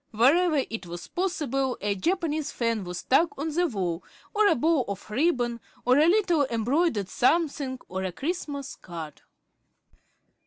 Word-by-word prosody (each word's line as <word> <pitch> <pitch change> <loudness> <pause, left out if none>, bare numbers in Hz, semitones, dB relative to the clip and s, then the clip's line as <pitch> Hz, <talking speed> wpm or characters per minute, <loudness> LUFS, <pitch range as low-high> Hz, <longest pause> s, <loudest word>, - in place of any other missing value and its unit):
Wherever 285 +6 +4
it 225 -5 -5
was 175 +1 -7
possible, 285 -8 -1
a 205 0 0
Japanese 315 - -1
fan 230 -4 -1
was 180 0 -5
stuck 310 - +2
on 305 +2 -3
the 350 +2 +2
wall, 185 - -2 0.3
or 425 -1 +4
a - - +4
bow 310 +1 +2
of 200 -1 -6
ribbon, 245 -3 +1 0.3
or 255 +3 +5
a 310 - +5
little 345 -7 +3
embroidered 235 - +1
something, 280 - +1
or 190 +1 -4
a 185 - -2
Christmas 285 - -4
card. 165 -4 -8
270 Hz, 150 wpm, -27 LUFS, 210-330 Hz, 0.3 s, or